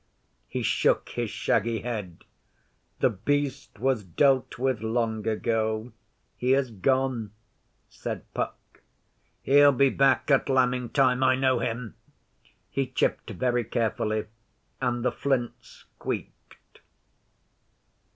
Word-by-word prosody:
He - - -3
shook - - +2
his - - -3
shaggy 115 -1 0
head. 105 -8 -5 0.8
'The - - +4
Beast 140 +5 -2
was 125 -1 0
dealt 130 - +2
with 130 -3 0
long 110 -1 -1
ago. 110 +1 -1 0.4
He 125 +1 +1
has 135 -3 +1
gone,' 120 0 0 0.5
said - - -6
Puck. - - -5 0.6
'He'll 145 +1 +6
be 135 +1 +4
back 135 +1 +3
at 135 0 +3
lambing 125 -2 +2
time. 130 -2 +3
I 130 0 +4
know 130 -1 +2
him.' 115 -2 -3 0.8
He 135 -1 -1
chipped 125 - -1
very 125 -1 0
carefully, 110 -2 -1 0.6
and 120 -1 -1
the - - +3
flints 130 -4 -3
squeaked. - - -7
125 Hz, 110 wpm, -27 LUFS, 110-135 Hz, 0.8 s, He'll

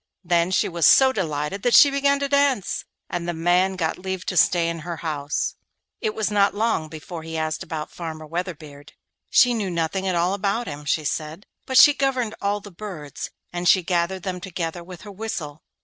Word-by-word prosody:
Then 170 0 +2
she 190 - +2
was 170 -2 +2
so 265 -1 +6
delighted 155 - -2
that 245 +1 +3
she 285 - +8
began 280 0 +2
to 280 - 0
dance, 280 -7 +1 0.2
and 175 -1 -4
the 175 - -2
man 180 +3 +2
got 165 -2 -2
leave 190 0 -4
to 185 - -3
stay 170 -1 +4
in 165 0 -3
her 170 +1 -6
house. 145 -2 -2 0.5
It 215 - -2
was 215 -1 -1
not 200 -1 +3
long 215 -7 0
before 160 +2 -8
he 160 0 -6
asked 155 0 -2
about 155 -2 -5
Farmer 160 -2 -7
Weatherbeard. 155 -4 -6 0.4
She 245 -1 +5
knew 210 -5 -2
nothing 170 +3 -1
at 185 - 0
all 175 +2 +1
about 200 +4 -1
him, 145 -4 -7
she 155 +2 0
said, 155 +5 -4 0.2
but 260 - +1
she 290 - +9
governed 260 -5 0
all 200 +1 0
the 205 - -11
birds; 170 -7 -7 0.2
and 175 0 +1
she 185 - +5
gathered 175 +1 -1
them 180 -1 -4
together 175 -2 -4
with 180 0 -11
her 210 - -10
whistle. 185 -8 -5
180 Hz, 200 wpm, -23 LUFS, 160-205 Hz, 0.5 s, she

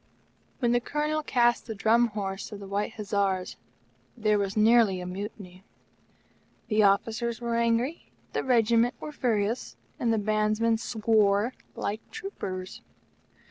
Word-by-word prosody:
When 240 -3 +1
the 240 - +3
Colonel 300 +4 -1
cast 240 -5 +2
the 220 - -4
Drum 230 +4 +3
horse 195 -2 -5
of 205 - -7
the 200 - -8
White 200 +3 -2
Hussars, 200 -3 -1 0.6
there 215 -2 +2
was 200 +1 -2
nearly 215 -3 +5
a 180 - -6
mutiny. 185 0 -7 1.1
The 215 -1 +3
officers 220 +3 +1
were 235 -1 -2
angry, 235 +6 0 0.2
the - - -1
Regiment 235 -1 +3
were 305 - -6
furious, 230 -4 -1 0.2
and 235 - +1
the 225 - +2
Bandsman 215 +2 +1
swore 215 0 +2 0.2
like 210 +2 -3
troopers. 185 - -6
220 Hz, 135 wpm, -27 LUFS, 200-235 Hz, 1.1 s, nearly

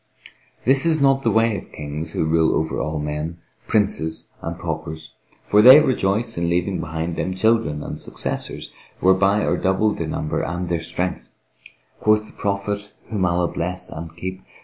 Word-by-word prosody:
This 135 +2 +4
is 160 -1 +3
not 135 -1 +4
the - - +1
way 115 -1 +3
of - - -8
Kings 75 +2 -6
who - - 0
rule 80 0 +3
over 80 0 -1
all 75 +2 -2
men, 75 +3 -3 0.3
princes. 100 -7 0
and - - -5
paupers; 80 0 -5 0.3
for 105 - +5
they 130 +6 +10
rejoice 115 - 0
in 85 0 0
leaving 90 +2 0
behind 80 +1 -3
them 95 - -2
children 110 -7 +1
and - - -6
successors - - -3 0.3
whereby 95 +3 +3
are - - +1
doubled 95 +3 +1
their 80 - -2
number 75 0 -2
and 85 +1 -3
their 85 -1 0
strength. 90 +2 -3 0.7
Quoth 110 0 +3
the - - -14
Prophet 100 +1 -3 0.2
(whom 100 -4 0
Allah 85 0 +1
bless 90 +2 -3
and 80 0 -8
keep!) 95 +2 -5
95 Hz, 170 wpm, -22 LUFS, 80-105 Hz, 0.7 s, they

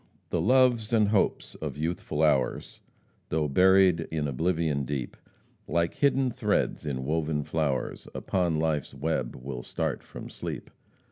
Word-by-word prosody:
"The - - +1
loves 125 -4 +3
and 110 -3 +4
hopes 105 -2 +1
of - - -6
youthful 80 -1 -2
hours, 70 -5 +1 0.5
Though 75 -1 +1
buried 90 +1 +4
in 75 -2 -1
oblivion 80 0 0
deep, 65 -2 -4 0.5
Like 85 0 +1
hidden 135 -2 +2
threads 80 - 0
in 65 -2 -3
woven 75 0 0
flowers, 70 -4 -2
Upon 85 -4 0
life's 75 -4 -1
web 70 -3 -2
will 65 -1 -6
start - - -3
from - - -9
sleep. - - -6
80 Hz, 135 wpm, -28 LUFS, 70-95 Hz, 0.5 s, and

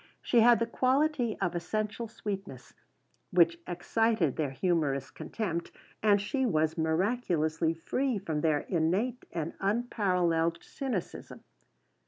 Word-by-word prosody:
She 240 - +3
had 235 +1 +7
the 230 - 0
quality 260 0 +1
of 180 -3 0
essential 215 +6 -3
sweetness 195 - -6 0.6
which 170 -1 +4
excited 180 - +1
their 155 -3 -1
humorous 145 -2 0
contempt, 170 -7 -4 0.3
and 205 -1 +4
she 265 +7 -1
was 160 -9 +1
miraculously 165 -2 0
free 255 +9 -1
from 160 -6 -3
their 155 -2 +2
innate 190 +9 0
and 165 -1 -3
unparalleled 180 -6 +1
cynicism. 250 -10 -5
185 Hz, 115 wpm, -30 LUFS, 165-230 Hz, 0.6 s, had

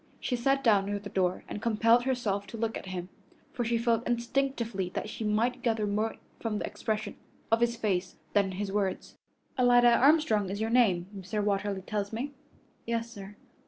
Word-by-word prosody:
She 250 - -1
sat 270 +3 +1
down 205 -4 +4
near 205 0 -1
the 205 0 -8
door 185 -1 0
and 210 - -6
compelled 230 +2 +3
herself 210 -6 -1
to 225 - -8
look 225 0 -1
at - - -6
him, 180 -1 -5 0.4
for 245 - -1
she 235 0 +1
felt 230 0 +1
instinctively 235 -5 -1
that - - -3
she 220 - -5
might 230 +4 +1
gather 225 -3 +1
more 210 +2 -1 0.2
from 220 -2 -2
the - - -2
expression 215 -1 -3 0.3
of 225 +1 +4
his 235 0 +2
face 190 -5 -1 0.2
than 205 -1 +4
from 185 - -6
his 200 -1 -2
words. 195 -2 -2 0.4
"Alida 245 -1 +6
Armstrong 265 - +4
is 200 +2 -4
your 220 +1 -1
name, 200 -8 +4
Mr. 195 +2 -3
Watterly 200 -1 -1
tells 205 0 -3
me?" 250 +6 -3 0.6
"Yes, 230 0 -2
sir." 200 -2 -10
220 Hz, 190 wpm, -29 LUFS, 200-235 Hz, 0.6 s, Alida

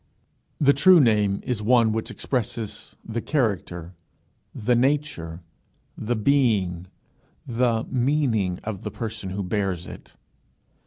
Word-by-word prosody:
The 140 -1 +5
true 175 +6 +6
name 105 -6 +3
is 120 -4 -2
one 115 0 +4
which 110 +1 -3
expresses 115 -3 -4
the 115 +1 -3
character, 95 - -2 0.6
the 120 +3 0
nature, 120 - 0 0.5
the 120 +2 -2
being, 105 -8 +1 0.6
the 115 -1 +1
meaning 120 -8 +1
of 105 -3 -5
the - - -4
person 110 -4 -5
who 100 +2 -3
bears 95 -2 -2
it. - - -12
110 Hz, 115 wpm, -24 LUFS, 100-125 Hz, 0.6 s, true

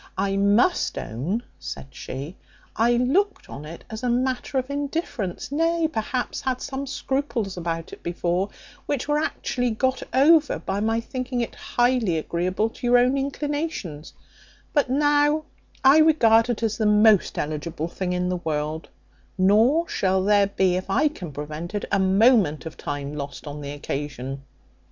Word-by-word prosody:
I 195 +1 0
must 205 - +2
own," 165 - -3 0.2
said 135 - -7
she, 140 +6 -7 0.4
"I 235 +2 +3
looked 305 +13 +1
on 145 - -8
it 165 +2 -9
as 220 0 -7
on 245 - +1
a - - +3
matter 255 +1 -1
of 260 +1 -1
indifference; 280 - -3
nay, 330 +2 +2
perhaps, 245 -2 -3
had 255 -1 -1
some 275 0 -5
scruples 265 -7 -2
about 165 -2 -4
it - - -10
before, 175 +3 -1 0.4
which 280 -2 -2
were 295 0 +2
actually 250 -5 -1
got 260 +3 0
over 300 +3 +5
by 195 +1 -3
my 225 +2 +1
thinking 255 +1 -4
it 235 - -3
highly 240 -8 +1
agreeable 180 +6 -1
to 245 - -5
your 245 0 +6
own 250 +2 +3
inclinations; 280 - -3 0.6
but 290 -4 +2
now 295 +2 +3 0.4
I 270 +3 +7
regard 235 -8 +5
it 230 -1 -2
as 225 0 -1
the 215 - +2
most 210 -1 +4
eligible 155 +2 -3
thing 180 +1 -3
in 180 0 0
the 180 - -1
world: 155 -1 -3 0.5
nor 225 - +4
shall 190 -1 +1
there 205 0 +4
be, 190 -2 +1
if 185 +1 -5
I 285 +10 +3
can 180 - -8
prevent 150 +6 -6
it, 205 - -2
a 200 - +3
moment 190 - +4
of 160 - -7
time 145 0 -5
lost 140 0 -6
on 145 0 -6
the 140 - -6
occasion." 140 -2 -5
215 Hz, 165 wpm, -24 LUFS, 175-265 Hz, 0.6 s, I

